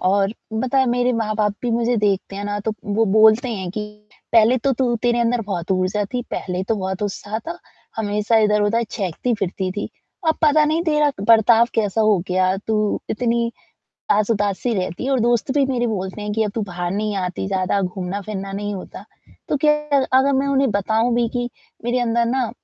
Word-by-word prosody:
और 195 +2 +2 0.2
बता 255 +4 0
है, 265 - +4
मेरे 245 +1 +1
माँ-बाप 215 -2 0
भी 240 - -1
मुझे 235 +1 +1
देखते 200 -2 0
हैं 200 - -4
ना, 205 0 -2
तो 220 +2 -2
वो 210 +2 +1
बोलते 220 +4 +5
हैं 190 -5 -4
कि, 210 +2 -4 0.5
"पहले 230 +2 +5
तो 270 +3 +1
तू 245 -1 0
तेरे 240 0 +2
अंदर 235 0 +1
बहुत 180 -2 -4
ऊर्जा 190 +3 0
थी, 245 - 0
पहले 180 0 -3
तो 225 - +2
बहुत 190 +1 -3
उत्साह 205 +2 -3
था, 335 +9 -7 0.4
हमेशा 210 +1 0
इधर-उधर 210 +2 +2
चहकती-फिरती 190 -1 -2
थी, 205 - -4 0.4
अब 315 - +2
पता 305 0 +5
नहीं, 315 +3 +1
तेरा 300 -2 +3
क - - -4
बर्ताव 230 +1 +6
कैसा 210 -1 +1
हो 215 -3 +4
गया, 185 +1 +2
तू 215 -1 0
इतनी 235 +1 0 0.6
आस 210 +1 +3
उदास 205 -3 0
ही 235 - +1
रहती 185 +3 -3
है" 275 - -1
और 260 - +2
दोस्त 240 +2 +1
भी 285 - +3
मेरे 245 -2 0
बोलते 195 -2 -4
हैं 210 0 -3
कि, 220 - +1
"अब 210 - -2
तू 225 - -1
बाहर 175 -2 -4
नहीं 210 0 -2
आती 185 0 -3
ज़्यादा, 190 0 0
घूमना-फिरना 195 +2 -4
नहीं 205 +1 -3
होता।" 185 - -9 0.4
तो 295 - +1
ख़ैर 300 -2 +2
अगर 270 +2 +4
मैं 270 +1 +1
उन्हें 270 -3 +2
बताऊँ 220 +4 +1
भी 240 -1 +1
कि, 245 +1 -2 0.4
मेरे 245 +1 0
अंदर 235 0 +1
ना, 250 -1 0
220 Hz, 200 wpm, -21 LUFS, 200-240 Hz, 0.6 s, बर्ताव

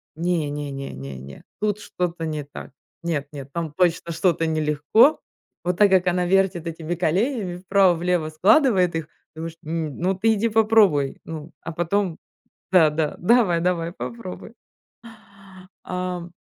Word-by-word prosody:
"Не-не-не-не-не, 140 - -4 0.2
тут 210 -1 0
что-то 175 -4 -3
не 155 -2 -3
так. 140 0 -10 0.3
Нет-нет, 145 -4 -4
там 170 -2 -3
точно 170 0 +1
что-то 170 -1 +1
нелегко". 155 - +3 0.4
Вот 180 0 -1
так 205 0 +6
как 185 -1 +4
она 180 0 +1
вертит 185 -2 +1
этими 165 +1 -4
коленями, 185 - 0
вправо-влево 180 -3 +2
складывает 185 - +3
их, 165 -2 -3 0.3
думаешь: 165 +1 -6
"М, 160 -2 -3
ну 185 +3 +1
ты 220 +4 +2
иди 220 +2 0
попробуй. 210 -10 +3
Ну, 160 0 -8
а, 165 - -6
потом" 175 +1 -1 0.5
Да, 170 -4 +6
да, 150 0 -1
давай, 185 -3 +3
давай, 170 -1 0
попробуй. 230 0 -8 1.3
Ам 180 -1 -4
175 Hz, 130 wpm, -23 LUFS, 155-190 Hz, 1.3 s, так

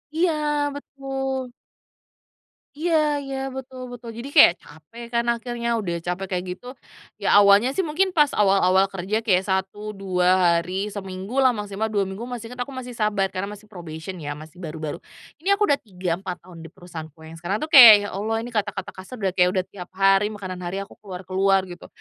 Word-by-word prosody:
Iya 335 0 +2 0.4
betul. 270 -2 -4 1.2
Iya 325 +2 0 0.3
iya, 270 0 -5 0.2
betul 260 -1 -8
betul, 240 -1 -9
jadi 250 +4 -6
kayak 225 - +9
capek 160 +11 -13
kan 235 0 +1
akhirnya, 235 0 -4
udah 180 -5 -3
capek 180 +2 -3
kayak 180 - -2
gitu. 245 - -15 0.5
Ya - - +1
awalnya 200 +4 +6
sih, 280 - -5
mungkin 370 +5 +1
pas 300 -5 +3
awal-awal 195 -2 +4
kerja 195 +3 -2
kayak 190 -4 +3
1, 195 +2 -2
2 180 -2 +3
hari, 190 +4 -3
seminggu 195 +5 -4
lah, 255 -3 +4
maksimal 210 +1 -3
2 210 -2 0
minggu, 195 +5 -6
masih 235 -2 -7
inget, 250 - -11
aku 265 +2 -5
masih 250 -1 -6
sabar 210 -4 0
karena 185 +2 -3
masih 210 - -17
probation 170 0 -8
ya, 145 -1 -5
masih 155 +3 -13
baru-baru. 155 -3 -5 0.4
Ini 400 +4 +2
aku 415 - 0
udah 285 - +3
3, 180 -4 -4
4, 185 -3 -7
tahun 175 -2 -13
di - - -10
perusahaanku 165 -4 -10
yang 160 +1 -11
sekarang 185 +5 -2
tuh 310 - -4
kayak, 240 -5 +12
"Ya 205 - -4
Allah 215 +3 -1
ini 245 - -8
kata-kata 205 -3 -2
kasar 190 +7 -10
udah 195 -4 -1
kayak, 180 -1 +4
udah 185 - +2
tiap 180 -2 -10
hari 195 +1 +4
makanan 190 -4 -7
hari 180 +2 -4
aku 200 - -15
keluar-keluar." 190 0 0
Gitu. 175 -1 -11
195 Hz, 190 wpm, -23 LUFS, 185-240 Hz, 1.2 s, kayak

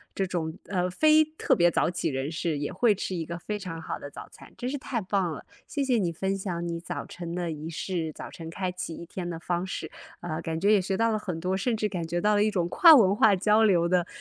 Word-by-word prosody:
这 195 - 0
种， 170 -2 -3
呃， 180 -2 -1
非 310 +10 +5
特 310 +1 0
别 175 -1 +4
早 - - +1
起 175 - -2
人 135 +1 -3
士 160 -1 -2
也 145 0 -3
会 215 +2 +3
吃 190 -1 -4
一 170 - -2
个 170 +2 -6
非 210 +4 -4
常 180 -4 -6
好 165 - -5
的 145 - -8
早 - - -10
餐， - - -15
真 245 - -4
是 280 +2 -3
太 255 -2 -3
棒 190 -2 0
了。 155 - -8 0.2
谢 285 - -2
谢 255 -4 +2
你 175 -4 0
分 190 +4 -2
享 175 -3 -3
你 170 0 -3
早 170 - -5
晨 170 -1 -7
的 175 -2 -2
仪 155 +1 -6
式， 165 -1 -3
早 - - -9
晨 165 -1 -8
开 185 +2 -3
启 180 -2 -5
一 170 - -8
天 175 +1 -5
的 165 -2 -5
方 175 +1 -2
式。 190 - -5 0.3
呃， 165 -2 -4
感 160 -1 -3
觉 200 +4 +4
也 205 - +4
学 190 +1 -2
到 230 +1 +2
了 215 - 0
很 180 -6 -4
多， 185 +3 -1
甚 225 +4 0
至 215 - 0
感 180 -5 -4
觉 175 +2 -1
到 210 +4 +2
了 205 0 +4
一 215 - +2
种 180 -5 0
跨 330 - +8
文 200 -7 +5
化 210 -1 +5
交 210 +4 +3
流 175 -5 +4
的 175 0 +1
180 Hz, 290 characters per minute, -27 LUFS, 170-210 Hz, 0.3 s, 跨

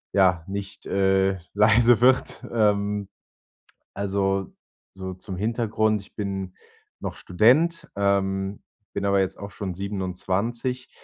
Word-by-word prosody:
ja, 90 -4 +4
nicht, 100 0 -6
äh, 95 -1 +2
leise 115 +3 +5
wird. 130 +1 +3
Ähm. 105 -2 +1 0.8
Also, 95 -1 -1 0.4
so 95 -1 -6
zum 95 +1 -7
Hintergrund, 110 -1 0
ich - - -18
bin 95 -3 -4 0.5
noch - - -5
Student, 135 - +3
ähm, 100 0 0 0.3
bin 100 - -2
aber 100 0 +3
jetzt 95 - -2
auch 100 0 -8
schon 100 -2 -5
27. 100 +6 -3
100 Hz, 115 wpm, -25 LUFS, 95-110 Hz, 0.8 s, leise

